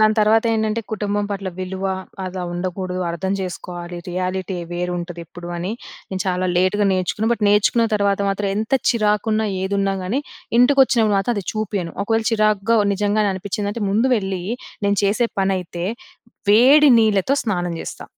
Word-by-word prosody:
దాని 215 0 +5
తర్వాత 220 +2 +4
ఏంటంటే, 220 0 0
కుటుంబం 205 -1 -1
పట్ల 195 -1 -3
విలువ 190 +1 -4 0.4
అలా 185 0 -5
ఉండకూడదు, 185 +1 -3
అర్థం 190 +3 -2
చేసుకోవాలి, 175 -1 -6
రియాలిటీ 185 +1 -2 0.2
వేరుంటది 175 0 -4
ఎప్పుడు 175 +1 -10
అని, 180 +5 -3 0.4
నేను 190 -1 -3
చాలా 185 0 0
లేట్‌గా 195 +3 +2
నేర్చుకుని 185 +4 0
బట్, 230 - -3
నేర్చుకున్న 210 +3 +3
తర్వాత 200 -1 +1
మాత్రం 200 0 -1
ఎంత 220 +5 0 0.2
చిరాకున్నా, 215 -1 +1 0.2
ఏదున్నా 195 0 0
కాని 220 +10 -1 0.4
ఇంటికొచ్చినప్పుడు 245 -5 +4
మాత్రం 235 +5 0
అది 195 - -3
చూపియను. 205 -6 -3
ఒకవేళ 225 +1 0
చిరాగ్గా 215 +1 +2 0.2
నిజంగానే 205 +1 +1
అనిపించిందంటే 205 +3 -3
ముందు 220 +6 +2
వెళ్ళి, 190 -3 -3 0.4
నేను 200 -1 +1
చేసే 215 +4 +2
పనైతే 185 -2 -1 0.6
వేడి 270 +7 +7
నీళ్లతో 215 +3 +3
స్నానం 175 -5 -1
చేస్తా. - - -7
200 Hz, 140 wpm, -21 LUFS, 185-215 Hz, 0.6 s, వేడి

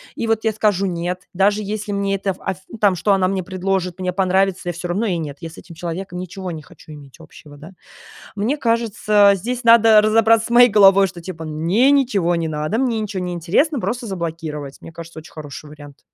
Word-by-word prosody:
и 230 - -3
вот 225 0 0
я 220 - +1
скажу 205 -2 +1
нет, 180 0 -4
даже 200 +3 +2
если 210 0 -5
мне 200 0 -1
это, 195 0 -2
аф 190 -2 -4
ну 230 - -9
там, 205 -3 +3
что 190 +4 0
она 190 -1 +2
мне 190 0 -2
предложит, 185 0 -3
мне 185 -1 -2
понравится, 190 0 0
я - - -3
всё 175 +2 -6
равно 195 +6 -1
ей 185 -5 -1
нет, 150 -4 -6
я 165 - -6
с 160 - -15
этим 170 -1 -13
человеком 175 +2 -6
ничего 185 +1 -6
не 160 -2 -7
хочу 150 - -17
иметь 145 0 -14
общего, 150 -2 -15
да". 155 +5 -12 0.6
Мне 220 +9 -1
кажется, 215 -4 +2
здесь 240 +6 -4
надо 225 -2 +6
разобраться 225 +1 +3
с - - -14
моей 245 +1 +6
головой, 195 -2 +6
что 175 -1 -10
типа 165 -2 -8
мне 170 - +2
ничего 210 -11 +1
не 165 -1 -2
надо, 155 +8 -2
мне 245 -4 0
ничего 205 -3 -4
не 180 0 -4
интересно, 200 - 0
просто 235 +1 -3
заблокировать. 160 -6 -6
Мне - - -11
кажется, 165 0 -10
очень 160 - -15
хороший 150 -1 -9
вариант. 145 -1 -14
190 Hz, 215 wpm, -19 LUFS, 170-215 Hz, 0.6 s, надо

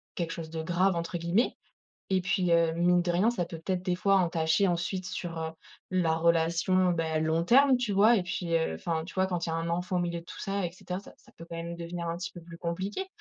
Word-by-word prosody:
quelque 170 -2 -2
chose 160 -1 -6
de 160 -1 -3
«grave» 180 +2 +2
entre 170 +1 -3
guillemets 175 +9 +1 0.6
et 190 - +3
puis 185 -1 +1
heu, 165 -1 +4
mine 175 +1 +3
de 175 - -1
rien, 195 +7 +3
ça 195 -8 -1
peut 165 -1 -7
peut-être 185 +1 -2
des 180 -2 +1
fois 195 +1 +3
entacher 170 +1 +2
ensuite 180 +2 -2
sur, 175 -2 -5
heu, 160 0 -3 0.4
la 175 -3 +2
relation, 170 +3 +2
bah, 160 -2 0
long 160 +1 +1
terme, 270 +5 +6
tu 245 -4 -1
vois? 215 +4 +6
Et 190 - +1
puis, 175 -2 -2
heu, 160 - 0
enfin, 160 - -2
tu 170 - -11
vois? 190 0 +2
Quand 175 -2 -2
il - - -2
y - - -2
a 165 - 0
un 165 0 -2
enfant 180 +2 -1
au - - +1
milieu 170 -1 -2
de - - -17
tout - - -10
ça 195 -1 -1
et 170 - -7
cetera, 180 0 -5
ça - - -14
ça - - -21
peut 165 - -10
quand - - -7
même 170 +1 -5
devenir 170 0 -5
un 165 - -2
petit 180 - -5
peu 175 - -10
plus 170 0 -11
compliqué. 190 - -3
175 Hz, 265 wpm, -29 LUFS, 165-185 Hz, 0.6 s, terme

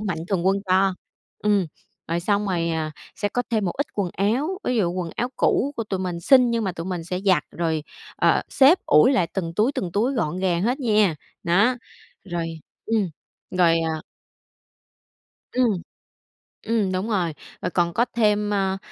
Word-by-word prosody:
mạnh 190 -6 -2
thường 185 -2 0
quân 195 +1 +4
cho. 190 +1 +3 0.4
Ừm. 205 -3 +2 0.4
Rồi 170 +1 0
xong 205 +2 +1
rồi, 170 -3 0
à, 160 -1 -2 0.2
sẽ 205 - -1
có 245 +4 -1
thêm 220 -3 +1
một 175 - -1
ít 285 - 0
quần 195 -4 -1
áo, 255 - 0
ví 250 - 0
dụ 180 -6 +1
quần 180 -2 -3
áo 245 - 0
cũ 285 +2 +2
của 230 - -2
tụi 190 -2 -3
mình 175 -2 -3
xin, 250 +4 +5
nhưng 230 -1 0
mà 190 - -1
tụi 165 +1 -6
mình 175 -3 -3
sẽ 180 +2 -3
giặt 185 -7 +3
rồi, 160 -2 -1 0.3
ờ, - - +3
xếp 280 +7 +5
ủi 150 - +6
lại 215 -10 +2
từng 165 -4 -2
túi, 220 +9 +2
từng 180 -9 -3
túi 225 +8 +1
gọn 185 - -1
gàng 180 -2 +1
hết 250 +7 0
nha. 210 - +3 0.3
Nó. 200 +9 +3 0.5
Rồi. 165 -3 -4 0.2
Ừm. 215 -5 0 0.4
Rồi, 170 -3 +3
à 160 -1 -2 1.5
Ừm. 230 -8 +1 0.8
Ừm, 215 -4 0
đúng 190 +5 -2
rồi. 180 -6 0 0.3
Rồi - - -1
còn 170 0 +1
có 235 +6 +2
thêm, 210 -2 +2
a, 195 -1 0
190 Hz, 185 wpm, -23 LUFS, 170-220 Hz, 1.5 s, ủi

